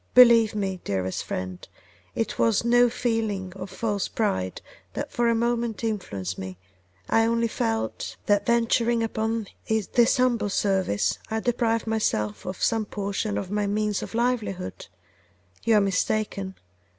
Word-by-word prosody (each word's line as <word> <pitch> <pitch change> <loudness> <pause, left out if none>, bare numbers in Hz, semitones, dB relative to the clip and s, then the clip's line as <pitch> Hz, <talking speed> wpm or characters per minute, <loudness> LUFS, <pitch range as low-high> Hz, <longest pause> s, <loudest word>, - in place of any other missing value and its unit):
Believe 235 -3 +7
me, 190 -3 -2
dearest 95 -1 -2
friend, 90 -1 -5 0.5
it 225 - -2
was 230 0 +3
no 245 +1 +5
feeling 220 -6 -1
of 190 0 -7
false 205 +1 -1
pride 95 - -1 0.3
that - - -4
for 240 -1 +2
a 230 - +3
moment 235 -1 -1
influenced 100 - -3
me; 95 -1 -6 0.5
I 225 0 +3
only 230 0 +2
felt 110 - -2
' - - -37
'That 205 -1 +3
in - - -24
venturing 235 0 +2
upon 225 0 -1 0.2
this 220 +4 +3
humble 240 -4 +2
service 190 - +1
I 220 - 0
deprived 230 -1 0
myself 110 - -1
of 185 0 -4
some 225 -1 +2
portion 205 +1 -2
of 190 -1 -4
my 205 -1 0
means 210 0 0
of - - -6
livelihood: 230 - -1 0.8
you 230 - +4
are 210 - +6
mistaken. 195 0 -1
215 Hz, 150 wpm, -25 LUFS, 190-230 Hz, 0.8 s, Believe